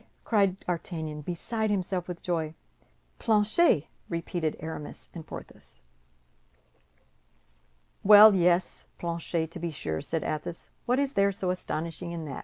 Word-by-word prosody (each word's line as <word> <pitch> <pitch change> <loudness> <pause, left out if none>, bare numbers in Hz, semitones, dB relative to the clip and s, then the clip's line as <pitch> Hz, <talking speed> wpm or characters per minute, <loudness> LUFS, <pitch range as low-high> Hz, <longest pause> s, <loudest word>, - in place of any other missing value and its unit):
cried 195 -4 +2
D'Artagnan, 160 -3 -4
beside 215 +7 -2
himself 185 -3 -1
with 175 -2 -7
joy. 160 -3 -2 0.6
"Planchet!" 215 - +3 0.2
repeated 170 -2 -2
Aramis 160 -1 -7
and 165 -3 -9
Porthos. - - -10 2.2
"Well, 210 +1 +10
yes, 175 -1 +2
Planchet, 170 -1 -2
to 175 - -7
be 170 +1 -2
sure," 80 - -3
said 165 - -2
Athos, 155 +2 -4 0.2
"what 250 +1 +3
is 280 0 0
there 200 0 +3
so 190 -2 -1
astonishing 170 -1 -4
in 165 -2 -5
that? 140 -3 -5
175 Hz, 125 wpm, -28 LUFS, 160-200 Hz, 2.2 s, Well